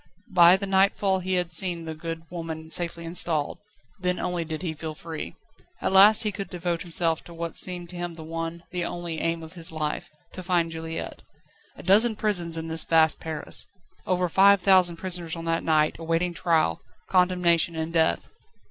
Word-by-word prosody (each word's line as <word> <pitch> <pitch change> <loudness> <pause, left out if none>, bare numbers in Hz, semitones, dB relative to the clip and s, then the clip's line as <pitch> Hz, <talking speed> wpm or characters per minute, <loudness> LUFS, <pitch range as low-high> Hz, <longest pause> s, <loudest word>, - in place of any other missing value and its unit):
By 175 0 +7
the 200 - -3
nightfall 195 0 +2
he 185 0 -1
had 180 -1 0
seen 170 0 0
the 160 - -5
good 165 +1 -6
woman 160 -2 -6
safely 170 -1 -2
installed. 165 -3 0 0.4
Then 180 0 -1
only 180 -2 -2
did 160 0 -6
he 165 -3 -2
feel 155 0 -7
free. 160 0 -7 0.4
At - - -1
last 205 +3 +7
he 210 - 0
could 195 0 -6
devote 175 -1 -3
himself 165 -2 0
to 170 - -12
what 170 -1 -5
seemed 175 -1 -1
to - - -10
him 175 -1 -4
the 160 - -9
one, 165 +1 -5
the 180 -1 -2
only, 170 -2 -4
aim 165 0 -2
of 160 - -11
his 165 -3 -5
life 155 -1 -3 0.2
to 185 - -7
find 175 -2 0
Juliette. 165 0 -6 0.6
A - - -11
dozen 215 +5 +5
prisons 175 -6 0
in 160 0 -4
this 160 0 -1
vast 160 -2 +3
Paris! 155 -2 -6 0.4
Over 180 -1 +1
five 200 +3 +5
thousand 185 -2 +4
prisoners 175 -2 -4
on 165 0 -7
that 165 0 0
night, 155 -1 +2
awaiting 165 +2 -1
trial, 165 - +1 0.3
condemnation 180 -2 +2
and 160 +1 -4
death. 160 - +1
170 Hz, 185 wpm, -25 LUFS, 165-180 Hz, 0.6 s, By